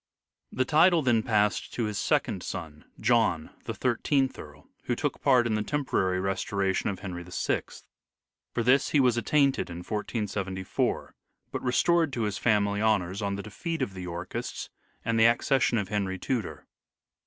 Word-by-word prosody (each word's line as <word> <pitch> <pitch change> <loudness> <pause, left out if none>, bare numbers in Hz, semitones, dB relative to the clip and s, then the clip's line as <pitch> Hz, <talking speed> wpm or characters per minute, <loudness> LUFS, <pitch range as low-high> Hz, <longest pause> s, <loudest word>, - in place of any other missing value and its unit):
The 130 - 0
title 160 +3 +5
then 120 -3 +3
passed 105 -2 0
to 120 - -1
his 105 -2 -2
second 120 - 0
son, 80 -5 -7
John, 110 -8 +2
the - - -3
Thirteenth 130 +2 +1
Earl, 75 -1 -12 0.2
who - - 0
took - - -2
part 125 -3 +4
in 115 - 0
the 105 - +1
tem 145 +6 -2
porary 95 -6 +1
restoration 95 0 0
of 95 -2 -5
Henry 90 -3 -5
VI. 90 - -1 0.9
For 115 - -1
this 130 +4 +4
he 150 - +3
was 125 -3 +4
at 110 - -8
tainted 140 -8 +2
in 85 - -6
1474, 100 -3 -2 0.4
but - - -3
restored 165 +5 +2
to 115 - -1
his 105 -2 -2
family 105 -2 +2
honours 100 -3 +1
on 100 -1 -1
the 100 - -5
defeat 160 - -3
of 100 - -4
the 95 - -7
Yorkists 90 0 -5 0.3
and 115 0 +1
the 110 - +6
accession 120 +1 +2
of 100 -3 -2
Henry 100 -3 -1
Tudor. 115 +1 -3
105 Hz, 170 wpm, -28 LUFS, 95-125 Hz, 0.9 s, the